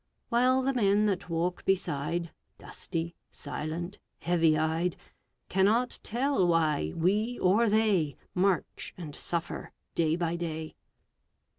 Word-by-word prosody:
While 255 +2 +3
the 270 +1 +1
men 210 -3 +3
that 190 -3 -1
walk 170 +2 -1
beside, 170 -2 -1 0.3
Dusty, 170 -1 -5 0.2
silent, 160 +5 -5 0.2
heavy 165 -3 +3
eyed, 160 +3 0 0.5
Cannot 215 +6 +2
tell 245 -5 +1
why 155 - +2
we 210 +8 +1
or 210 +5 +3
they 205 -9 +2 0.2
March 185 0 0
and 160 -5 -7
suffer 170 0 -3 0.2
day 160 -1 +2
by 170 -1 -1
day. 160 -2 -4
175 Hz, 115 wpm, -29 LUFS, 165-210 Hz, 0.5 s, While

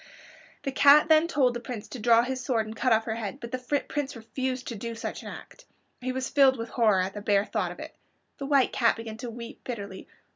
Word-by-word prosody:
The 275 - -2
cat 285 +3 +6
then 315 +1 +5
told 265 -7 +2
the 240 - -4
Prince 235 -3 -7
to 255 - -7
draw 230 +1 +5
his 255 0 -3
sword 235 -5 0
and 220 +1 -8
cut 255 +2 +1
off 225 0 +4
her 225 -1 -3
head, 225 +4 -5
but 235 -3 -8
the 255 - -2 0.3
Prince 285 -2 -3
refused 255 +3 -4
to 235 - -5
do 230 +2 -5
such 225 - -5
an - - -10
act. - - -11 0.4
He 255 +1 -2
was 260 0 -2
filled 270 -2 +4
with 230 0 -5
horror 215 -6 +3
at 190 +1 -3
the 205 - -6
bare 200 -1 +2
thought 200 -4 -2
of 175 - -11
it. - - -8 0.5
The 275 - -4
White 275 -3 +3
Cat 235 -2 +3
began 225 -1 -7
to 245 +1 -6
weep 235 +3 -9
bitterly. 200 -6 -7
235 Hz, 245 wpm, -27 LUFS, 220-260 Hz, 0.5 s, cat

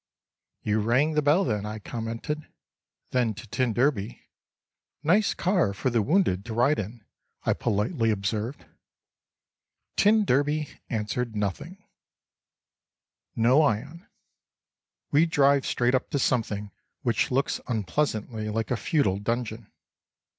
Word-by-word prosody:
"You 105 0 +1
rang 125 +9 +2
the 150 - +2
bell 150 +7 +4
then," 105 -5 -1
I 105 +1 -5
commented—then 115 0 -5
to 110 +3 -10
t 125 +3 0
d: 120 -3 0 0.8
"Nice 195 +7 +3
car 175 - +1
for 130 +5 -1
the 115 -1 +2
wounded 130 - +2
to 115 -2 -5
ride 130 +6 +3
in," 105 +2 -6 0.4
I - - +2
politely 105 +2 0
observed. 110 +5 -2 1.3
T 215 +1 +5
d 150 -1 +1 0.2
answered 115 +1 -2
nothing…. 105 - -4 1.5
Noyon. 140 +5 +2 1.0
We 155 +4 +4
drive 140 -3 +3
straight 125 +1 +1
up 130 - 0
to - - -1
something 105 -6 0 0.3
which 120 -5 +1
looks 135 +2 0
unpleasantly 110 - -1
like 110 +2 -2
a 125 - +1
feudal 105 - +1
dungeon. 115 0 -3
120 Hz, 115 wpm, -26 LUFS, 110-145 Hz, 1.5 s, T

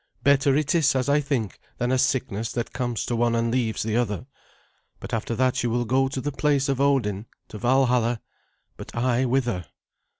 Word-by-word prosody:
Better 140 -1 +4
it 150 -1 +1
is, 160 -6 +3
as 130 0 0
I 145 +1 +4
think, 130 - -2 0.2
than 125 +1 -1
a 130 - +2
sickness 125 -5 0
that 120 -1 -3
comes 120 -4 -2
to 120 - -2
one 115 0 +2
and 115 0 0
leaves 115 -3 0
the 110 +1 -1
other. 110 -3 -1 0.7
But - - -8
after 115 +1 -2
that 130 +1 +1
you 120 - 0
will 120 +1 0
go 135 +3 +2
to 135 0 -4
the 145 +3 -3
place 140 0 +1
of 135 -1 0
Odin, 115 -7 +1 0.2
to 105 - -8
Valhalla; 125 -1 +2 0.6
but - - -10
I 125 +1 +1
whither?" 120 -8 0
125 Hz, 195 wpm, -24 LUFS, 115-135 Hz, 0.7 s, Better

